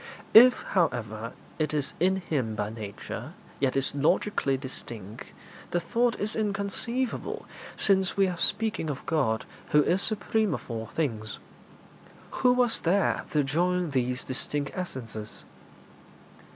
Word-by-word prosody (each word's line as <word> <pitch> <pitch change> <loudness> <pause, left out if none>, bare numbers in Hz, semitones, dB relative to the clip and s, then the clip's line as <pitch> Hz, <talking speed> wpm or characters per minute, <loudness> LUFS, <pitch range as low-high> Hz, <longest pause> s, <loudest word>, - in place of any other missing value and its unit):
If, 245 +2 +8
however, 115 - -1 0.3
it 155 0 0
is 145 -2 0
in 185 +3 +3
Him 145 - -2
by 105 0 -2
nature, 105 -3 -7 0.3
yet 135 -1 +1
is 135 0 +1
logically 145 -1 +1
distinct, 115 -6 -8 0.4
the 175 - +1
thought 235 +5 0
is 215 +1 -2
inconceivable, 215 +4 -2 0.3
since 190 -2 +2
we 195 -1 +4
are 175 -2 -4
speaking 220 -7 +1
of 140 -2 -5
God, 130 -9 0 0.2
who 150 0 +5
is 185 +6 +2
supreme 215 -1 +2
of - - -8
all 110 -1 -4
things. 110 -8 -2 1.0
Who 250 - +6
was 250 -2 +4
there 190 +4 +1
to 150 -1 +2
join 175 +4 0
these 125 -1 0
distinct 140 +2 0
essences? 115 - -6
155 Hz, 130 wpm, -28 LUFS, 125-200 Hz, 1.0 s, If